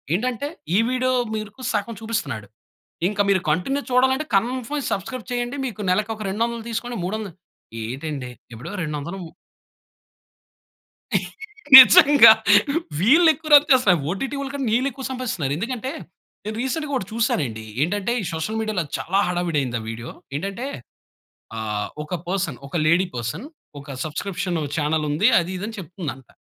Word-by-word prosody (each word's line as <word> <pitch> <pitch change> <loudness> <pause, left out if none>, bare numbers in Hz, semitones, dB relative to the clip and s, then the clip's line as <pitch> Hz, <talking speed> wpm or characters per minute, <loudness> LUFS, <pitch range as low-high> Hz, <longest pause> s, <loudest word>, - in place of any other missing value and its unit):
ఏంటంటే 250 +5 -2 0.3
ఈ - - +5
వీడియో 255 0 0 0.2
మీకు 215 +3 -7
సగం 220 +1 -2
చూపిస్తున్నాడు, 220 - -3 0.6
ఇంక 205 0 -5
మీరు 190 -2 +3
కంటిన్యూ 225 - 0
చూడాలంటే 265 +4 +3
కన్ఫర్మ్ 255 +6 -1
సబ్‌స్క్రైబ్ 225 +5 -4
చేయండి. 245 +1 -2
మీకు 215 -4 -5
నెలకి 210 +4 0
ఒక 215 - -11
200 230 +3 -2
తీసుకోండి, 235 +1 -4
మూడొంద 210 +1 -3 0.5
ఏటండి? 135 +2 -5 0.2
ఇప్పుడు 115 - -8
200 155 +4 -5 2.6
నిజంగా! 255 0 +9 0.7
వీళ్ళెక్కువ 315 - +4
రన్ 290 +1 +8
చేస్తారు, 210 -10 +5
ఓటీటి 265 +9 -3 0.2
కంటే 280 -1 -3
వీళ్ళెక్కువ 265 +2 -1
సంపాదిస్తున్నారు. 200 - -2
ఎందుకంటే, 250 +5 -3 0.5
నేను 215 - -4
రీసెంట్‌గా 285 +3 -2
ఒకటి 190 - -2
చూసానండి. 145 - -1 0.2
ఏంటంటే 200 +7 0
ఈ - - -5
సోషల్ 165 +8 -3
మీడియాలో 215 -5 -1
చాలా 190 +3 0
హడావిడైంది 165 -9 -1
ఆ - - -9
వీడియో. 115 +2 -7 0.3
ఏంటంటే 195 - -4 0.9
ఆహ్, 105 -2 -3
ఒక 155 +4 -4
పర్సన్, 180 -8 -2
ఒక 140 - -9
లేడీ 175 +3 +4
పర్సన్, 120 - -4 0.3
ఒక 140 - -13 0.2
సబ్‌స్క్రిప్షన్ 175 +3 -3 0.2
చానెలుంది 155 +4 +1
అది 170 +2 -3
ఇది 200 - -5
అని 225 - -7
చెప్తుందంట. 160 -7 -7
205 Hz, 130 wpm, -22 LUFS, 160-250 Hz, 2.6 s, నిజంగా